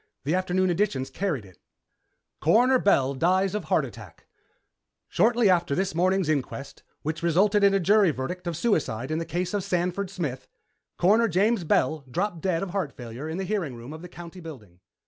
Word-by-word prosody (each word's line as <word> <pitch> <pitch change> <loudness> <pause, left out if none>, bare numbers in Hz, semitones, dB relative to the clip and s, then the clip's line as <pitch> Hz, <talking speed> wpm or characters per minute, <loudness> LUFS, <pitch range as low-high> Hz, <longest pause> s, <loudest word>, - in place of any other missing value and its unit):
The 145 +4 -1
afternoon 185 0 +1
editions 160 -8 -1
carried 155 - -2
it: 95 -2 -18 0.8
CORONER 245 +10 +4
BELL 140 - +3
DIES 185 +6 +1
OF 210 - -3
HEART 160 -7 +2
ATTACK 110 -6 -12 0.8
Shortly 230 +3 +3
after 175 -5 +2
this 190 +1 -1
morning's 185 +1 +1
inquest, 140 -2 -3 0.2
which 155 +2 -3
resulted 195 +5 +3
in 200 0 +5
a - - +3
jury 200 +1 +4
verdict 165 +6 -4
of 170 -3 -2
suicide 145 - 0
in 155 - 0
the 165 - -3
case 175 +3 -3
of 205 -2 -1
Sanford 180 +2 -1
Smith, 135 -9 -4 0.5
Coroner 215 +6 +4
James 200 +2 +2
Bell 155 -1 +1
dropped 175 +4 -2
dead 175 -1 0
of 190 - -5
heart 185 -7 -2
failure 120 +5 -7
in 160 - -4
the 190 - -2
hearing 185 - -2
room 120 +5 -9
of 160 - -9
the 180 - -9
County 175 +1 -10
building. 115 - -11
175 Hz, 185 wpm, -26 LUFS, 145-195 Hz, 0.8 s, in